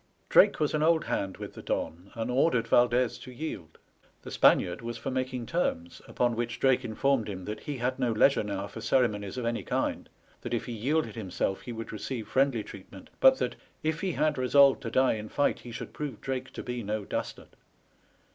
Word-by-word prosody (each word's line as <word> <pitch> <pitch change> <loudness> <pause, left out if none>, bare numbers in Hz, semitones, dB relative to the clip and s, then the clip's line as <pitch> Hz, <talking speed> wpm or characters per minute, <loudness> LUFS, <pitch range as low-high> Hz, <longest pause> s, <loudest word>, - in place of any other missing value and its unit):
Drake - - +6
was 150 -2 +1
an 155 - +1
old 160 0 +4
hand 95 -1 -2
with - - -7
the - - -9
Don, 90 +4 -3
and 115 +2 -2
ordered 125 -3 +2
Valdez 120 0 +3
to 125 - -10
yield. 120 - -6 0.5
The - - -8
Spaniard 90 0 +4
was 120 0 -5
for 135 - -4
making 130 -1 -2
terms, 85 - -2
upon 120 -1 0
which 120 +1 -3
Drake 130 -2 +3
informed 120 0 0
him 95 -2 -6
that 105 - -5
he 145 -2 -5
had 125 +1 -1
no 120 - +1
leisure 125 +5 +4
now 100 -2 -3
for 110 +2 -9
ceremonies 105 -3 +1
of 125 - -2
any 115 0 -1
kind, - - -2 0.3
that - - -2
if 115 - -3
he - - -6
yielded 145 +8 0
himself 95 -2 -2
he 125 - -7
would 115 -1 -6
receive 110 +2 -5
friendly 130 -4 +2
treatment, - - -12
but - - +7
that, - - -2 0.3
"If 160 +1 -1
he 190 -3 -1
had 150 -3 +1
resolved 135 +2 +5
to - - -4
die 130 0 +3
in 110 0 -6
fight, 145 - +1
he 120 - -10
should 115 - -7
prove 150 -2 -5
Drake 130 -1 -4
to - - -6
be 125 -1 -4
no 105 -1 -3
dastard. - - -5
120 Hz, 205 wpm, -29 LUFS, 110-135 Hz, 0.5 s, but